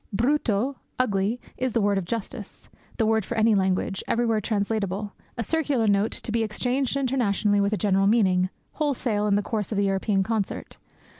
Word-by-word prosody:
Brutto 245 Hz, +1 st, +1 dB, 0.2 s
ugly 210 Hz, -1 st, +1 dB, 0.2 s
is 255 Hz, -2 st, -1 dB
the 235 Hz, -, +2 dB
word 200 Hz, -1 st, +2 dB
of 185 Hz, -, -5 dB
justice, 225 Hz, 0 st, -6 dB, 0.3 s
the 225 Hz, -, +2 dB
word 220 Hz, 0 st, +2 dB
for 235 Hz, +5 st, -5 dB
any 220 Hz, 0 st, +4 dB
language, 190 Hz, -1 st, 0 dB
everywhere 230 Hz, -2 st, +1 dB
translatable, 205 Hz, -1 st, -2 dB, 0.2 s
a 230 Hz, -, -1 dB
circular 285 Hz, -3 st, +1 dB
note, 205 Hz, +1 st, +3 dB
to -, -, -3 dB
be 230 Hz, +1 st, +1 dB
exchanged 250 Hz, +5 st, 0 dB
internationally 220 Hz, -6 st, +1 dB
with 200 Hz, +1 st, +1 dB
a 215 Hz, -, +1 dB
general 195 Hz, -1 st, +2 dB
meaning, 185 Hz, -4 st, +3 dB, 0.2 s
wholesale, 245 Hz, -8 st, 0 dB
in 200 Hz, -, +3 dB
the 205 Hz, -, +1 dB
course 210 Hz, -1 st, -3 dB
of 210 Hz, -, -1 dB
the 200 Hz, -, +2 dB
European 195 Hz, 0 st, +1 dB
concert. 215 Hz, -1 st, -3 dB
215 Hz, 175 wpm, -25 LUFS, 200-235 Hz, 0.3 s, any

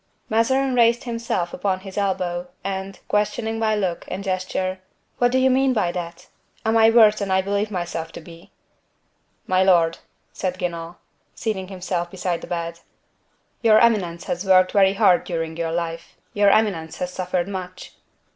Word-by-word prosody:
Mazarin 260 Hz, +4 st, +2 dB
raised 235 Hz, -1 st, +3 dB
himself 230 Hz, -7 st, -3 dB
upon 185 Hz, 0 st, -1 dB
his 195 Hz, -1 st, -10 dB
elbow, 185 Hz, -3 st, -1 dB, 0.2 s
and, 195 Hz, 0 st, -4 dB
questioning 220 Hz, +2 st, -1 dB
by 220 Hz, -1 st, +1 dB
look 185 Hz, -5 st, -2 dB
and 190 Hz, +2 st, -5 dB
gesture: 185 Hz, 0 st, -2 dB, 0.4 s
"What 245 Hz, 0 st, +3 dB
do 260 Hz, -, +2 dB
you 260 Hz, 0 st, +4 dB
mean 265 Hz, 0 st, +3 dB
by 205 Hz, -7 st, +1 dB
that? 175 Hz, 0 st, -6 dB, 0.4 s
Am 220 Hz, +1 st, +2 dB
I 225 Hz, 0 st, +6 dB
worse 220 Hz, -2 st, +6 dB
than 200 Hz, -2 st, -3 dB
I 190 Hz, 0 st, +2 dB
believe 200 Hz, +2 st, -1 dB
myself 175 Hz, -4 st, -4 dB
to -, -, -7 dB
be?" 165 Hz, +1 st, -14 dB, 1.0 s
"My 185 Hz, 0 st, +2 dB
lord," 170 Hz, -3 st, +3 dB, 0.3 s
said 185 Hz, -1 st, -3 dB
Guenaud, 170 Hz, -1 st, -4 dB, 0.4 s
seating 195 Hz, -4 st, -3 dB
himself 180 Hz, -2 st, -3 dB
beside 180 Hz, -2 st, -3 dB
the -, -, -8 dB
bed; 170 Hz, -1 st, -4 dB, 0.8 s
"your 220 Hz, -2 st, +6 dB
eminence 195 Hz, -7 st, +2 dB
has 175 Hz, +2 st, -3 dB
worked 185 Hz, -1 st, +4 dB
very 195 Hz, -1 st, +4 dB
hard 195 Hz, -4 st, +4 dB
during 165 Hz, -2 st, -4 dB
your 165 Hz, 0 st, -2 dB
life; 165 Hz, 0 st, -4 dB, 0.2 s
your 205 Hz, -1 st, +4 dB
eminence 195 Hz, -7 st, +1 dB
has 180 Hz, 0 st, -4 dB
suffered 180 Hz, -1 st, -2 dB
much." 185 Hz, -2 st, -7 dB
190 Hz, 165 wpm, -22 LUFS, 175-215 Hz, 1.0 s, I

